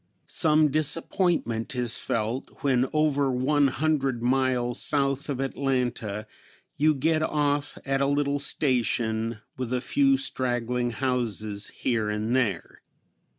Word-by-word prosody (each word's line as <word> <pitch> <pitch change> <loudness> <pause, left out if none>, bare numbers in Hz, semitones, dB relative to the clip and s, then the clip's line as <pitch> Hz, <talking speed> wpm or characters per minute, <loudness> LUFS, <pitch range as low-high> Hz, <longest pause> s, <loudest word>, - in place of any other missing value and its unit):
Some 155 -2 +3
disappointment 155 - 0
is 120 -2 -1
felt 115 +6 -3
when 130 -2 +2
over 145 -3 +2
one 140 +3 +2
hundred 135 -3 0
miles 125 -1 +1
south 140 0 +1
of 135 -3 -2
Atlanta 125 -6 -2 0.5
you 155 +1 +3
get 155 +3 +1
off 145 -2 0
at 135 0 0
a 140 - +3
little 145 0 +1
station, 115 -5 0 0.2
with 125 -2 -4
a 125 - +1
few 275 - +2
straggling 125 - -1
houses 110 -5 -2 0.2
here 110 -4 +1
and 105 +3 -1
there. 105 -9 -1
130 Hz, 120 wpm, -26 LUFS, 120-145 Hz, 0.5 s, Some